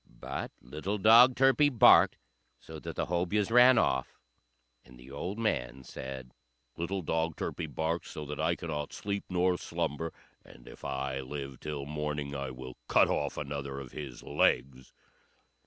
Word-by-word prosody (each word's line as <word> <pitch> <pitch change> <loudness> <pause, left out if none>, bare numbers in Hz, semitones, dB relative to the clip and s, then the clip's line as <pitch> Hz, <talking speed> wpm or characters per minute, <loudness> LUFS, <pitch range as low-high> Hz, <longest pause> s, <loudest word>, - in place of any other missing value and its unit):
But - - -5
little 75 +11 -4
dog 115 +5 +7
Turpie 135 +2 +4
barked 125 -6 +6 0.4
so - - -10
that - - -7
the - - -1
Hobyahs 90 +6 0
ran 125 +1 +7
off; 65 - +1 0.7
and 65 -1 -17
the 65 +2 -13
old 90 +9 -4
man 65 - -2
said, 65 0 -8 0.4
"Little 90 +3 -3
dog 80 0 -1
Turpie 80 - -4
barks 80 +4 -2
so 75 -3 -6
that 75 +1 -6
I 80 +2 +1
cannot 75 -4 -5
sleep 100 0 -4
nor 90 0 +1
slumber, 80 -1 -3 0.3
and - - -16
if - - -13
I 65 0 -3
live 70 -1 -6
till 75 -2 -5
morning 75 -1 -3
I 70 -1 -3
will 65 0 -9
cut - - +4
off - - -1
another 70 -1 -4
of 65 -3 -9
his 70 -5 -8
legs." 65 -1 0
75 Hz, 155 wpm, -30 LUFS, 70-90 Hz, 0.7 s, dog